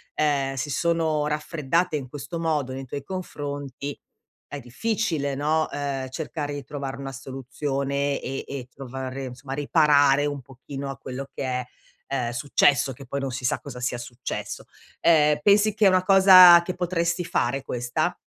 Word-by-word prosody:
ehm, 140 -3 +1
si 145 +2 -3
sono 160 -1 +1
raffreddate 150 +2 -1
in 130 -3 -6
questo 145 +3 -6
modo 150 -5 -1
nei 135 0 -6
tuoi 140 +2 -6
confronti, 145 -5 -6 0.5
è 145 - -6
difficile, 150 - -2
no, 155 +3 +1
uhm, 140 -2 -3
cercare 145 +1 -4
di 145 -1 -5
trovare 140 0 -6
una 135 0 -6
soluzione 135 +2 -3
e 135 +1 -4
e 135 -3 -6
trovare 130 0 -6
insomma 130 +2 -8
riparare 145 -1 +4
un 145 -2 -3
pochino 135 +2 -8
a 135 - -6
quello 130 +2 -7
che - - -5
è, 125 -1 -2 0.4
ehm, 125 -4 -1
successo, 135 +1 +2
che 135 +2 -12
poi 140 - -3
non 135 -1 -3
si 130 +1 -5
sa - - +1
cosa 125 - -9
sia 125 0 -1
successo. 120 +1 -6 0.4
Ehm, 150 -3 +4
pensi 205 +1 +4
che 210 -1 +2
è - - +7
una 185 -1 +3
cosa 185 -2 +9
che 180 +1 -4
potresti 175 -1 -1
fare, 135 -4 -1
questa? 120 -2 -2
140 Hz, 165 wpm, -25 LUFS, 135-160 Hz, 0.5 s, cosa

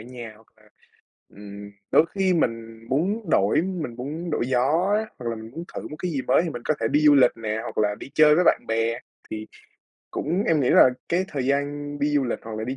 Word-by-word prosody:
nhà. 120 -1 -9
Hoặc 110 +1 -22
là, 110 - -25 0.7
ừm, 100 0 -11 0.2
đôi 160 - +5
khi 190 -2 +2
mình 115 -6 -2
muốn 190 - -1
đổi 105 +5 +3
mình 170 -9 -4
muốn 150 +8 -5
đổi 135 -6 -1
gió 145 +10 +2
á, 220 - -1
hoặc 120 - -8
là 115 - -3
mình 110 +1 -10
muốn 165 +4 -7
thử - - -5
một 150 - -8
cái 180 -1 -2
gì 140 -4 -2
mới 130 - +3
thì 170 - -2
mình 120 -5 -7
có 155 - +2
thể 115 - 0
đi 145 - +2
du 150 -1 +6
lịch 125 -3 +6
nè, 110 -1 -3
hoặc - - -8
là 105 -1 +1
đi 135 - -10
chơi 155 -1 +6
với 180 - +3
bạn - - +3
bè. 115 +1 0 0.3
Thì 110 0 -5 0.6
cũng 175 +7 -1
em 160 -3 +3
nghĩ 125 - +2
là 130 - +7 0.2
cái 180 +2 +1
thời 135 -3 -3
gian 145 +1 -2
đi 145 - +1
du 140 -2 +2
lịch 120 - -2
hoặc 110 -1 -7
là 110 - -3
đi 130 +3 -4
135 Hz, 245 wpm, -24 LUFS, 115-155 Hz, 0.7 s, là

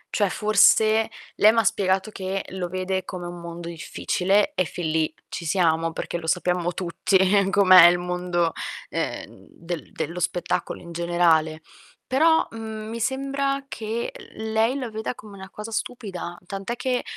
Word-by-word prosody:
Cioè 205 -2 +2
forse, 215 +2 +4 0.3
lei 215 - +6
m'ha 225 -1 +2
spiegato 190 0 +1
che 190 -1 -4
lo 180 -2 -4
vede 185 +1 -2
come 180 -1 -7
un 175 0 -8
mondo 170 0 -7
difficile 190 - 0
e - - +2
fin 170 0 -4
lì 155 0 0
ci - - -6
siamo, 165 -1 +1
perché 165 - -4
lo 170 - -8
sappiamo 180 0 0
tutti 185 +2 +1 0.3
com'è 185 -3 +8
il 175 +1 +4
mondo, 175 -1 -1 0.4
ehm, - - -5
del 170 -1 -7
dello 165 +3 -4
spettacolo 175 +1 -2
in 170 -1 -11
generale. 165 -2 +2 0.5
Però, 320 +5 +4
mhmm, 220 -1 -7
mi 230 +1 -5
sembra 275 +2 -1
che 225 -1 -4 0.2
lei 220 +3 +1
la 250 -3 -4
veda 220 +2 -4
come 210 -3 -12
una 190 -1 -10
cosa 210 +3 -8
stupida, 200 -7 -5
tant'è 195 +6 -5
che, 250 0 -1
190 Hz, 155 wpm, -24 LUFS, 175-220 Hz, 0.5 s, com'è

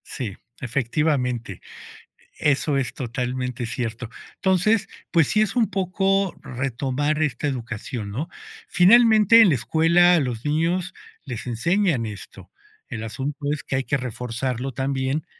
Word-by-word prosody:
Sí, 110 -8 -5 0.2
efectivamente. 125 - -1 0.8
Eso 145 0 +1
es 130 -4 -2
totalmente 125 -1 -3
cierto. 115 0 -4 0.3
Entonces 195 +3 +2 0.2
pues 165 -5 +4
sí 215 - +2
es 210 -2 0
un 235 -3 +2
poco 195 0 0
retomar 135 +4 -2
esta 150 0 -1
educación, 120 -4 -5
¿no? 140 +10 -3 0.4
Finalmente, 220 +3 +6
en 210 - +7
la 150 - +3
escuela, 165 +7 +4
a - - +3
los 125 -6 -3
niños 170 +5 0 0.3
les 125 -3 -6
enseñan 165 - +1
esto. 105 -3 -10 0.4
El 110 -1 -5
asunto 130 +6 -4
es 150 - -3
que 130 - -2
hay 135 - -1
que 140 - 0
reforzarlo 125 +1 -4
también 135 +2 -2
135 Hz, 130 wpm, -23 LUFS, 125-175 Hz, 0.8 s, en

